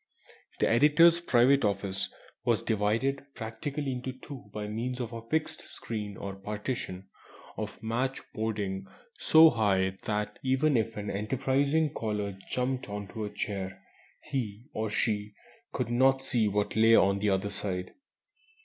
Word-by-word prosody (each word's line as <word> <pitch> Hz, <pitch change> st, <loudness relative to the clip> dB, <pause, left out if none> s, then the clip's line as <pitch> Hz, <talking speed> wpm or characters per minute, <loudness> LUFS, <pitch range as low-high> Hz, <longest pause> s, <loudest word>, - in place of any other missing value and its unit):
The -, -, +2 dB
editor's 150 Hz, +8 st, +6 dB
private 135 Hz, -3 st, +4 dB
office 100 Hz, -2 st, 0 dB, 0.3 s
was -, -, +1 dB
divided 115 Hz, +6 st, +1 dB
practically 135 Hz, +5 st, -4 dB
into 125 Hz, +1 st, -4 dB
two 130 Hz, -4 st, -10 dB
by 105 Hz, 0 st, -4 dB
means 120 Hz, +4 st, -3 dB
of 120 Hz, -1 st, -4 dB
a 115 Hz, -, -5 dB
fixed 155 Hz, +6 st, -1 dB
screen 105 Hz, -3 st, -5 dB
or 100 Hz, 0 st, -5 dB
partition 105 Hz, -2 st, -4 dB, 0.5 s
of -, -, -6 dB
match 125 Hz, +4 st, -1 dB
boarding 105 Hz, -3 st, -2 dB, 0.3 s
so 160 Hz, 0 st, +8 dB
high 95 Hz, -4 st, +1 dB
that 105 Hz, 0 st, -2 dB
even 135 Hz, +3 st, +2 dB
if 115 Hz, -1 st, 0 dB
an 105 Hz, 0 st, -3 dB
enterprising 135 Hz, +8 st, +1 dB
caller 105 Hz, -5 st, -2 dB
jumped 130 Hz, -1 st, -1 dB
on 100 Hz, -1 st, -5 dB
to 110 Hz, 0 st, -4 dB
a -, -, -4 dB
chair 95 Hz, -3 st, -4 dB, 0.4 s
he 120 Hz, -6 st, -4 dB
(or 110 Hz, 0 st, -2 dB
she) 105 Hz, -1 st, 0 dB, 0.4 s
could 125 Hz, -3 st, -2 dB
not 135 Hz, +2 st, +3 dB
see 115 Hz, -5 st, +2 dB
what 105 Hz, 0 st, 0 dB
lay 115 Hz, +1 st, +6 dB
on 100 Hz, -1 st, +4 dB
the 105 Hz, +1 st, +1 dB
other 95 Hz, +1 st, 0 dB
side. 95 Hz, -3 st, -3 dB
110 Hz, 145 wpm, -29 LUFS, 105-130 Hz, 0.5 s, so